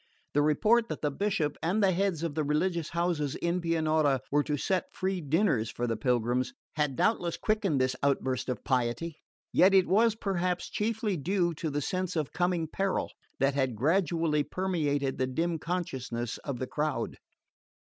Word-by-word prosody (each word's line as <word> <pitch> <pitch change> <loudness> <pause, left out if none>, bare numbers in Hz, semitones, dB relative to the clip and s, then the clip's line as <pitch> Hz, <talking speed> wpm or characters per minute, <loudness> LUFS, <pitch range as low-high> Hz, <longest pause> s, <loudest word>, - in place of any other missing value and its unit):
The 145 - +3
report 220 +10 +3
that - - -5
the 150 - +1
Bishop 190 -2 -1
and 190 +6 +1
the 195 - +5
heads 185 -3 0
of 165 -3 -2
the 155 +1 0
religious 160 +3 0
houses 170 -5 -1
in 170 +1 -1
Pianura 155 -5 +2
were 145 +1 +4
to 150 -1 -1
set 185 +5 -1
free 190 -2 -2
suppers 155 - +2
for 120 - -3
the 115 -1 0
pilgrims 120 +2 0 0.2
had 150 -3 0
doubtless 175 - +1
quickened 210 -9 +1
this 130 0 +1
outburst 130 -2 0
of 125 -4 -3
piety; 130 +6 -1 0.4
yet 190 +1 +6
it 190 -1 +5
was 220 +3 +4
perhaps 185 -4 -1
chiefly 215 -2 -1
due 175 +3 0
to 160 +1 -3
the 145 0 -2
sense 185 +4 -2
of 155 -4 -2
coming 175 -2 0
peril 195 +4 -1 0.3
that 135 +1 +3
had 130 -4 0
gradually 160 - +2
permeated 145 -8 -1
the 130 - +1
dim 165 +5 -1
consciousness 130 -9 -3
of 140 -3 -4
the 130 - -2
crowd. 150 -4 -2
160 Hz, 170 wpm, -29 LUFS, 140-185 Hz, 0.4 s, yet